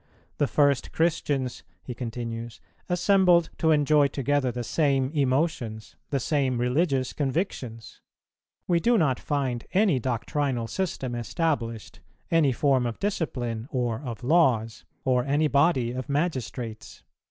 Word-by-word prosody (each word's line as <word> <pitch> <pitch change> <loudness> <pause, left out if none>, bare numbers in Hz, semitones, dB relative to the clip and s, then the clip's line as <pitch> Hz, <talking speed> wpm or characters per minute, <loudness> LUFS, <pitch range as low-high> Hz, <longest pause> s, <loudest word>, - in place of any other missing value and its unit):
The 145 - +3
first 140 -2 +2
Christians," 145 -6 0 0.2
he 125 - -6
continues, 115 -1 -6 0.3
"assembled 180 -1 +4
to 160 - +2
enjoy 150 -1 +4
together 140 -1 0
the 120 +1 -4
same 135 +3 +1
emotions, 130 -6 -1
the 140 - 0
same 135 -2 0
religious 130 +1 +1
convictions. 135 - -3 0.7
We 175 -2 +3
do 235 +6 +3
not 140 - +2
find 130 -5 -2
any 190 -8 +3
doctrinal 125 +1 -1
system 135 -4 -3
established, 120 - -2 0.3
any 160 -5 +4
form 130 -1 +2
of 115 - -5
discipline 125 - -2
or 125 -5 -1
of 125 -4 -7
laws, 125 -7 +2 0.2
or 125 -1 +2
any 145 +3 +2
body 140 -4 +2
of 130 +3 -5
magistrates." 130 -7 -3
135 Hz, 125 wpm, -26 LUFS, 120-155 Hz, 0.7 s, assembled